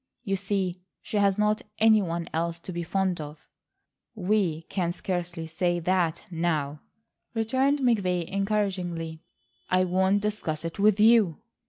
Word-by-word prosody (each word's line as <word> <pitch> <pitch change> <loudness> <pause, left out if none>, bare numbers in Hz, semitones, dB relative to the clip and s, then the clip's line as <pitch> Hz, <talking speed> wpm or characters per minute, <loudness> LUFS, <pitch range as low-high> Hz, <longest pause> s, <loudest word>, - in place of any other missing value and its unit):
You 195 -4 0
see 190 -2 -2 0.2
she 215 - -3
has 200 -1 +3
not 210 0 +2 0.2
any 220 -1 +5
one 170 -2 -3
else 170 +1 -1
to 185 - -7
be 170 - -3
fond 185 0 -1
of." 150 +1 -10 0.7
"We 185 -5 0
can 175 0 -2
scarcely 175 -2 -3
say 175 +2 0
that 170 -1 0
now," 155 -4 -1 0.5
returned 260 +6 +1
McVay 195 -8 +2
encouragingly. 185 -5 -2 0.5
"I 185 0 +3
won't 190 +2 +2
discuss 165 -7 -2
it 165 +3 -5
with 210 0 +4
you." 215 -7 +5
185 Hz, 140 wpm, -27 LUFS, 170-205 Hz, 0.7 s, any